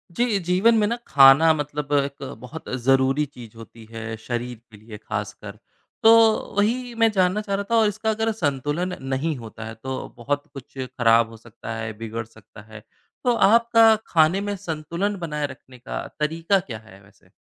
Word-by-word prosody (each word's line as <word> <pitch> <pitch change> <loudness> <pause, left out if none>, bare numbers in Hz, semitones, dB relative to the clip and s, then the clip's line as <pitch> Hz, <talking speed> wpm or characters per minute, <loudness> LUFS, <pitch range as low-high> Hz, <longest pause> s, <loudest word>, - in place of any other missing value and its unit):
जी, 235 -4 +1
जीवन 185 +6 +3
में 210 - +3
ना 235 - -1
खाना 140 +4 +7
मतलब 145 -1 -4
एक 140 0 0 0.2
बहुत 150 +6 -9
ज़रूरी 135 +3 +3
चीज़ 120 -6 -13
होती 115 0 -13
है, 115 0 -6
शरीर 120 +1 -5
के 105 - -14
लिए 105 +1 -11
ख़ासकर। 105 -1 -6 0.5
तो 225 - +8 0.5
वही 240 +4 0
मैं 230 0 +4
जानना 190 0 +1
चाह 200 -2 -2
रहा 200 - -2
था, 225 -1 +4
इसका 210 +1 -1
अगर 220 +1 0
संतुलन 155 0 -2
नहीं 145 +4 -1
होता 115 -1 -9
है 110 - -7
तो 130 +4 -6
बहुत 145 +4 -3
कुछ 135 -1 -12
ख़राब 115 -3 +2
हो 115 - -12
सकता 115 0 -9
है, 110 -1 -4
बिगड़ 115 0 -5
सकता 110 -1 -16
है 105 -1 -11 0.4
तो 245 - +3
आपका 230 0 +5
खाने 165 +4 +3
में 205 0 -3
संतुलन 170 +2 -3
बनाए 150 -3 -3
रखने 130 -1 -14
का 125 - -6
तरीका 165 +5 +1
क्या 120 -11 -8
है 110 -3 -17
वैसे? 100 -2 -24
145 Hz, 175 wpm, -23 LUFS, -, 0.5 s, तो